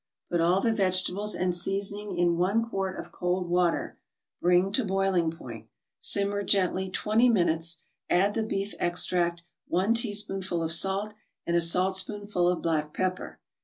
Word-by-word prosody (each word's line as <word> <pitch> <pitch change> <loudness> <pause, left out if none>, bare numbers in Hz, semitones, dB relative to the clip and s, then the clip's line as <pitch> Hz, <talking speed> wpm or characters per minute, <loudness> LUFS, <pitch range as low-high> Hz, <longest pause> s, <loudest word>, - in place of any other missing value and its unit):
Put 175 -1 0
all 180 +3 +2
the 225 +1 +1
vegetables 190 +1 +1
and 180 -1 -1
seasoning 200 +2 -1
in 175 -1 +1
one 200 +7 0
quart 195 -3 -4
of - - -9
cold 180 0 -3
water, 175 -1 -1 0.4
bring 180 +2 +2
to 250 +5 +1
boiling 195 -4 0
point, 115 -9 -10 0.3
simmer 200 0 +1
gently 190 -1 0
twenty 220 +6 +1
minutes, 165 -5 +1 0.3
add 195 +3 +2
the 225 - -2
beef 200 -2 -3
extract, 175 -1 +1 0.2
one 190 +6 +1
teaspoonful 195 -6 +1
of 160 - -1
salt 195 +5 +3 0.3
and 170 - -1
a 170 - +4
saltspoonful 190 +2 +2
of 180 - -2
black 155 -2 -2
pepper. 185 0 -4
185 Hz, 150 wpm, -26 LUFS, 175-200 Hz, 0.4 s, a